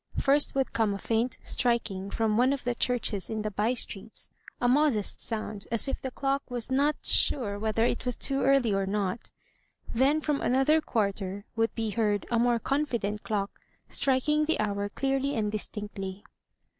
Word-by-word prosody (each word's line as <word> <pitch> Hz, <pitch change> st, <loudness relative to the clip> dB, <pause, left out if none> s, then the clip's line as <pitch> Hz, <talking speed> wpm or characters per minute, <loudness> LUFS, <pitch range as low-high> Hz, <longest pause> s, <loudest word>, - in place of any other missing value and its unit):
First 285 Hz, +1 st, +3 dB
would 270 Hz, -1 st, 0 dB
come 215 Hz, -3 st, +1 dB
a -, -, -4 dB
faint 230 Hz, +4 st, -1 dB
striking 220 Hz, -6 st, 0 dB
from 220 Hz, 0 st, 0 dB
one 250 Hz, +4 st, +4 dB
of 275 Hz, -, -4 dB
the 245 Hz, -, 0 dB
churches 235 Hz, -5 st, -1 dB
in 220 Hz, -1 st, -3 dB
the 215 Hz, -, -2 dB
by 215 Hz, +5 st, 0 dB
streets, 215 Hz, -2 st, -2 dB, 0.3 s
a 245 Hz, -, +2 dB
modest 255 Hz, -5 st, +2 dB
sound, 215 Hz, -2 st, -4 dB
as 230 Hz, +2 st, +1 dB
if 270 Hz, -, -3 dB
the 265 Hz, -, -3 dB
clock 275 Hz, +2 st, -1 dB
was 245 Hz, 0 st, -3 dB
not 285 Hz, +3 st, +1 dB
sure 205 Hz, -7 st, +4 dB
whether 220 Hz, +1 st, +1 dB
it 240 Hz, -, -1 dB
was 250 Hz, -2 st, 0 dB
too 275 Hz, -1 st, 0 dB
early 270 Hz, -5 st, +3 dB
or 195 Hz, 0 st, 0 dB
not; 200 Hz, +1 st, -2 dB, 0.6 s
then 270 Hz, +6 st, +3 dB
from 295 Hz, -2 st, -1 dB
another 270 Hz, +5 st, +3 dB
quarter 200 Hz, -5 st, -2 dB
would 225 Hz, 0 st, 0 dB
be 225 Hz, -2 st, -2 dB
heard 210 Hz, -2 st, 0 dB
a 235 Hz, -, +2 dB
more 240 Hz, 0 st, +3 dB
confident 235 Hz, -6 st, -1 dB
clock 200 Hz, -2 st, -2 dB, 0.4 s
striking 300 Hz, +3 st, +2 dB
the 320 Hz, -, 0 dB
hour 205 Hz, -1 st, -1 dB
clearly 270 Hz, +4 st, -1 dB
and 210 Hz, -2 st, 0 dB
distinctly. 205 Hz, -2 st, -5 dB
230 Hz, 175 wpm, -28 LUFS, 210-270 Hz, 0.6 s, one